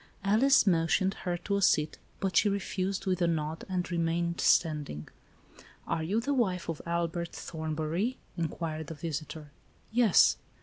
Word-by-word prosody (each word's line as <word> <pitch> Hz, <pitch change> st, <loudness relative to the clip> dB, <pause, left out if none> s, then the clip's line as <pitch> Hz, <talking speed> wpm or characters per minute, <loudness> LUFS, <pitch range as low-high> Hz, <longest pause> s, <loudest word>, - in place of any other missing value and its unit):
Alice 230 Hz, +7 st, +4 dB
motioned 185 Hz, +1 st, +2 dB
her 175 Hz, -1 st, -3 dB
to 200 Hz, +3 st, -2 dB
a -, -, -1 dB
seat, 155 Hz, -4 st, +2 dB, 0.2 s
but 195 Hz, -1 st, -2 dB
she 210 Hz, -, +5 dB
refused, 195 Hz, -1 st, -2 dB
with 185 Hz, -1 st, 0 dB
a 170 Hz, -, +4 dB
nod, 160 Hz, -1 st, -2 dB
and 180 Hz, -1 st, -2 dB
remained 170 Hz, 0 st, 0 dB
standing. 150 Hz, -, +1 dB, 0.8 s
"Are 160 Hz, -, -1 dB
you 190 Hz, +8 st, 0 dB
the' 280 Hz, +5 st, -1 dB
wife 190 Hz, -9 st, 0 dB
of 165 Hz, -, -4 dB
Albert 170 Hz, 0 st, -2 dB
Thornbury," 160 Hz, +8 st, -3 dB, 0.2 s
in 170 Hz, -2 st, -1 dB
quired 160 Hz, -1 st, -5 dB
the 160 Hz, -, -6 dB
visitor. 155 Hz, -1 st, -6 dB, 0.2 s
" -, -, -34 dB
Yes." 225 Hz, -4 st, +5 dB
170 Hz, 160 wpm, -30 LUFS, 160-195 Hz, 0.8 s, she